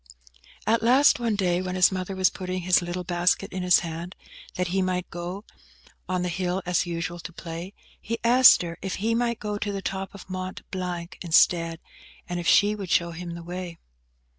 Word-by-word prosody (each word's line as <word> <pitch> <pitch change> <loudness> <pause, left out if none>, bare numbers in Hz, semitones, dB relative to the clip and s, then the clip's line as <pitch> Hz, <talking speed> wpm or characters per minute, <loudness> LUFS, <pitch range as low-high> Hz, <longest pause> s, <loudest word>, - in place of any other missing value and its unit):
At 225 +1 +2
last, 255 +4 +5
one 230 -3 0
day, 180 -3 +1
when 185 0 -4
his 185 +1 +5
mother 185 0 -4
was 185 -1 +3
putting 185 -1 -4
his 180 0 +4
little 175 +1 -4
basket 175 0 0
in 185 - -3
his 180 0 +5
hand, 170 +1 -6 0.4
that 180 0 -1
he 190 +2 +1
might 185 -1 -1
go 175 +4 -6 0.6
on 180 -1 0
the - - -1
hill 180 +1 -2
as 180 0 +1
usual 170 0 -4
to 170 - -8
play, 170 +2 -7 0.3
he 230 +1 -3
asked 245 -3 +7
her 170 -1 -6
if 190 -1 -3
he 225 +4 0
might 235 0 0
go 210 -1 -3
to 205 - -2
the 195 -1 -5
top 195 +1 -4
of 200 - -11
Mont 185 0 -5
Blanc 180 -2 -5
instead, 165 -1 +3 0.5
and 175 0 -3
if 170 - -4
she 205 +5 +5
would 200 -4 -6
show 170 0 +2
him 170 0 -7
the 170 - -8
way. 175 -1 -6
180 Hz, 200 wpm, -25 LUFS, 175-195 Hz, 0.6 s, asked